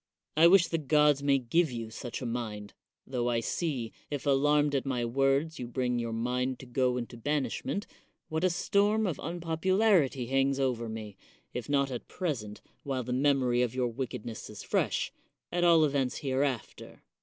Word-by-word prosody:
I 160 Hz, +2 st, +7 dB
wish 185 Hz, 0 st, +6 dB
the 165 Hz, -, 0 dB
gods 150 Hz, -1 st, +3 dB
may 140 Hz, -1 st, +3 dB
give 145 Hz, +5 st, +1 dB
you 115 Hz, -2 st, -5 dB
such 120 Hz, +3 st, -6 dB
a -, -, -3 dB
mind; 110 Hz, -4 st, -4 dB, 0.3 s
tho 125 Hz, -2 st, -1 dB
I 120 Hz, -1 st, +1 dB
see, 125 Hz, -2 st, -2 dB, 0.2 s
if 145 Hz, -1 st, -4 dB
alarmed 145 Hz, +1 st, +3 dB
at 135 Hz, -, +1 dB
my 125 Hz, -3 st, -1 dB
words 135 Hz, +6 st, +1 dB
you 125 Hz, -, -4 dB
bring 125 Hz, 0 st, -1 dB
your 115 Hz, -1 st, -3 dB
mind 125 Hz, +3 st, -1 dB
to -, -, -11 dB
go 125 Hz, 0 st, +1 dB
into 120 Hz, 0 st, -5 dB
banishment, 150 Hz, -, -2 dB, 0.4 s
what 160 Hz, +2 st, -2 dB
a 185 Hz, -, +4 dB
storm 205 Hz, +5 st, +2 dB
of 175 Hz, -7 st, -2 dB
unpopularity 170 Hz, -, +1 dB
hangs 135 Hz, +2 st, +1 dB
over 120 Hz, -4 st, 0 dB
me, 110 Hz, -3 st, -7 dB, 0.4 s
if 125 Hz, +2 st, -5 dB
not 140 Hz, -1 st, +2 dB
at 125 Hz, -, -5 dB
present, 115 Hz, -, -4 dB, 0.2 s
while 135 Hz, -2 st, -2 dB
the 125 Hz, +1 st, -3 dB
mem 135 Hz, +1 st, +3 dB
ory 120 Hz, -1 st, +2 dB
of 125 Hz, 0 st, 0 dB
your 125 Hz, -2 st, +1 dB
wickedness 115 Hz, -2 st, -5 dB
is 105 Hz, -1 st, -9 dB
fresh, -, -, 0 dB, 0.4 s
at 175 Hz, 0 st, 0 dB
all 165 Hz, -2 st, +6 dB
events 135 Hz, -3 st, 0 dB
hereafter. 135 Hz, -3 st, -3 dB
135 Hz, 180 wpm, -30 LUFS, 120-150 Hz, 0.4 s, I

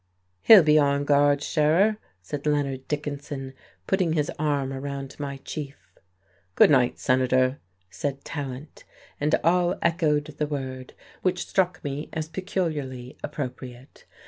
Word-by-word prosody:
"He'll 205 Hz, -, +9 dB
be 155 Hz, 0 st, +5 dB
on 140 Hz, 0 st, +2 dB
guard, 145 Hz, 0 st, +3 dB
Scherer," 170 Hz, +8 st, +3 dB, 0.3 s
said 145 Hz, +10 st, -5 dB
Leonard 140 Hz, -3 st, -1 dB
Dickinson, 145 Hz, -2 st, -4 dB, 0.3 s
putting 185 Hz, -4 st, +1 dB
his 150 Hz, -2 st, 0 dB
arm 140 Hz, -3 st, 0 dB
around 135 Hz, 0 st, -5 dB
my 140 Hz, -1 st, -4 dB
chief. 145 Hz, -2 st, -6 dB, 0.8 s
"Good -, -, +6 dB
night, 125 Hz, -4 st, +3 dB
Senator," 130 Hz, 0 st, +2 dB, 0.3 s
said 140 Hz, +3 st, -4 dB
Tallant, 140 Hz, 0 st, -7 dB, 0.4 s
and 150 Hz, +2 st, +2 dB
all 175 Hz, +2 st, +2 dB
echoed 160 Hz, -3 st, +2 dB
the 150 Hz, -, 0 dB
word, 130 Hz, -3 st, -6 dB, 0.3 s
which 185 Hz, -1 st, 0 dB
struck 180 Hz, -2 st, 0 dB
me 145 Hz, +1 st, -4 dB
as 155 Hz, -1 st, -3 dB
peculiarly 155 Hz, -8 st, -4 dB
appropriate. 130 Hz, -3 st, -7 dB
145 Hz, 125 wpm, -25 LUFS, 135-155 Hz, 0.8 s, He'll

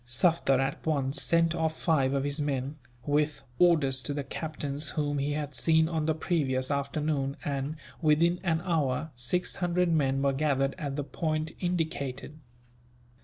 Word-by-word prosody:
Sufder 135 Hz, +2 st, +2 dB
at 135 Hz, +1 st, -2 dB
once 140 Hz, -3 st, 0 dB
sent 165 Hz, 0 st, +3 dB
off 160 Hz, -2 st, -1 dB
five 140 Hz, -6 st, +2 dB
of 135 Hz, -, 0 dB
his 145 Hz, +1 st, -1 dB
men, 140 Hz, 0 st, -2 dB, 0.3 s
with 150 Hz, +1 st, 0 dB, 0.2 s
orders 150 Hz, -7 st, +4 dB
to 140 Hz, +4 st, -4 dB
the 145 Hz, -, -2 dB
captains 145 Hz, 0 st, -3 dB
whom 145 Hz, -2 st, -1 dB
he 145 Hz, +1 st, 0 dB
had 150 Hz, -1 st, -3 dB
seen 160 Hz, +3 st, +3 dB
on 160 Hz, -2 st, -1 dB
the 160 Hz, -, +2 dB
previous 140 Hz, -6 st, 0 dB
afternoon 140 Hz, 0 st, -1 dB
and, 140 Hz, +1 st, -2 dB, 0.3 s
within 170 Hz, +3 st, +3 dB
an 170 Hz, -3 st, 0 dB
hour, 155 Hz, -3 st, 0 dB
six 125 Hz, +9 st, -1 dB
hundred 175 Hz, 0 st, +1 dB
men 135 Hz, -3 st, +2 dB
were 140 Hz, -1 st, +2 dB
gathered 135 Hz, -1 st, +1 dB
at 140 Hz, -2 st, -3 dB
the 145 Hz, -, -2 dB
point 155 Hz, +1 st, -2 dB
indicated. 155 Hz, -5 st, -3 dB
150 Hz, 160 wpm, -29 LUFS, 140-160 Hz, 0.3 s, orders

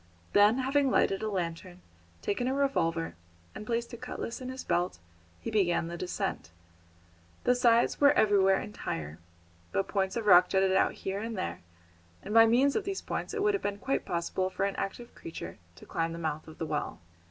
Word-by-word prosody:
Then, 205 Hz, +4 st, +6 dB
having 270 Hz, +1 st, +2 dB
lighted 195 Hz, -5 st, +2 dB
a 220 Hz, -, -1 dB
lantern, 180 Hz, -1 st, -4 dB, 0.4 s
taken 245 Hz, +5 st, -1 dB
a 260 Hz, -, 0 dB
revolver, 165 Hz, -13 st, 0 dB, 0.4 s
and 210 Hz, -, -8 dB
placed 235 Hz, +1 st, -2 dB
a -, -, -5 dB
cutlass 250 Hz, 0 st, -6 dB
in 255 Hz, -, -5 dB
his 260 Hz, 0 st, -6 dB
belt, 175 Hz, -, 0 dB, 0.4 s
he 230 Hz, -, -5 dB
began 175 Hz, -5 st, +1 dB
the 170 Hz, -, -5 dB
descent. 175 Hz, -, -3 dB, 0.9 s
The 250 Hz, -, +4 dB
sides 240 Hz, 0 st, +3 dB
were 285 Hz, 0 st, +8 dB
everywhere 195 Hz, -4 st, +4 dB
entire; 80 Hz, -, -5 dB, 0.5 s
but 195 Hz, -, 0 dB
points 190 Hz, -2 st, -1 dB
of 230 Hz, -2 st, -2 dB
rock 180 Hz, -2 st, +7 dB
jutted 190 Hz, 0 st, +2 dB
out -, -, +3 dB
here 195 Hz, +1 st, -4 dB
and 225 Hz, 0 st, -4 dB
there, 185 Hz, -, -4 dB, 0.6 s
and 205 Hz, -, -5 dB
by 225 Hz, 0 st, +8 dB
means 260 Hz, +5 st, +3 dB
of 430 Hz, -, 0 dB
these 390 Hz, 0 st, -4 dB
points -, -, -4 dB
it 410 Hz, -, -1 dB
would 415 Hz, 0 st, +3 dB
have 400 Hz, -, -1 dB
been 200 Hz, 0 st, -2 dB
quite 270 Hz, +6 st, -1 dB
possible 175 Hz, +2 st, -1 dB
for 190 Hz, +1 st, -1 dB
an 200 Hz, -, -2 dB
active 235 Hz, +5 st, -5 dB
creature 85 Hz, -, -8 dB, 0.2 s
to -, -, -14 dB
climb 165 Hz, -1 st, -1 dB
to -, -, -6 dB
the -, -, -7 dB
mouth 155 Hz, 0 st, -3 dB
of 160 Hz, -, -12 dB
the 165 Hz, -, -3 dB
well. 150 Hz, -1 st, -3 dB
200 Hz, 200 wpm, -30 LUFS, 175-240 Hz, 0.9 s, were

